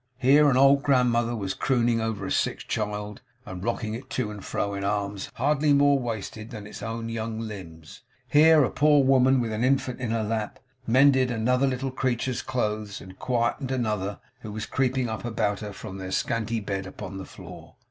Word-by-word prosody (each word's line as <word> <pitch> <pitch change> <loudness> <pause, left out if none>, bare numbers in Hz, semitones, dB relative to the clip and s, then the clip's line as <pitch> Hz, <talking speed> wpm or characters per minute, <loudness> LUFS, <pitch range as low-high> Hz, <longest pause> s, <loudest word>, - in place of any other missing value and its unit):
Here 140 +3 +5
an 130 - +2
old 140 +1 +6
grandmother 120 -4 +2
was 95 -4 -3
crooning 120 -3 +1
over 110 -3 -3
a - - -4
sick - - +1
child, 105 0 -3 0.2
and 95 -2 -7
rocking 110 -1 -2
it 130 +4 -7
to 115 -5 -2
and 105 -2 -9
fro, 100 0 -2
in 100 0 -4
arms 100 -1 -2
hardly 145 +3 +2
more 140 0 +4
wasted 110 -2 -5
than 110 -4 -8
its 105 - -9
own 115 0 -4
young 115 -1 -4
limbs; 95 -2 -9 0.3
here 155 +1 +6
a 125 - 0
poor 145 0 +4
woman 130 0 +4
with 115 -2 -1
an 110 +2 -2
infant 130 -1 +1
in 125 -3 -3
her 115 -1 0
lap, 110 +2 -3 0.3
mended 130 +1 +5
another 125 +3 +1
little 135 0 -2
creature's 130 -1 -1
clothes, 105 -5 -2
and 95 0 -13
quieted 125 +2 -1
another 105 -6 -2 0.2
who 110 -4 -8
was 110 +1 -4
creeping 130 -1 0
up 110 -1 -5
about 110 -3 -1
her 105 -1 -6
from 95 -1 -8
their 95 -1 -5
scanty 115 +3 -1
bed 95 -2 -4
upon 95 +1 -7
the - - -6
floor. - - -12
115 Hz, 190 wpm, -26 LUFS, 105-130 Hz, 0.3 s, old